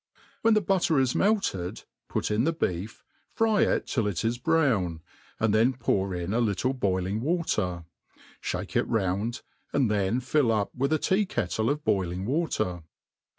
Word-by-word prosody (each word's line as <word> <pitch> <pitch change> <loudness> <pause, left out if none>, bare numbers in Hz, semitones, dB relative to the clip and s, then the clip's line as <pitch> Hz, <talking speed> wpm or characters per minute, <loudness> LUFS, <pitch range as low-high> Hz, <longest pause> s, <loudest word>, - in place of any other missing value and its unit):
When 225 -1 +4
the 215 - +4
butter 180 -5 +2
is 130 -2 +2
melted, 195 - 0 0.3
put - - -1
in 105 +2 +2
the 165 - +2
beef, 95 - -3 0.3
fry 220 -2 +2
it. - - +2
till 115 -5 0
it 100 0 -2
is 120 +1 0
browq, 120 - +1 0.4
and 110 -1 +2
then 115 +4 +4
pour 100 -6 0
in 90 +3 -3
a 115 - +2
little 115 +3 +1
boiling 100 -3 -1
watery 110 - -1 0.6
fhake - - -4
it - - +2
round, 105 +3 -1 0.3
and 135 -6 +2
then 105 +3 +1
fill 130 -1 +2
up 105 -2 0
with 135 +3 -1
a 155 - +4
tea 190 +6 +1
kettle 110 - -1
of 150 +1 -1
boiling 95 -3 0
water. 110 - -1
115 Hz, 165 wpm, -27 LUFS, 95-150 Hz, 0.6 s, When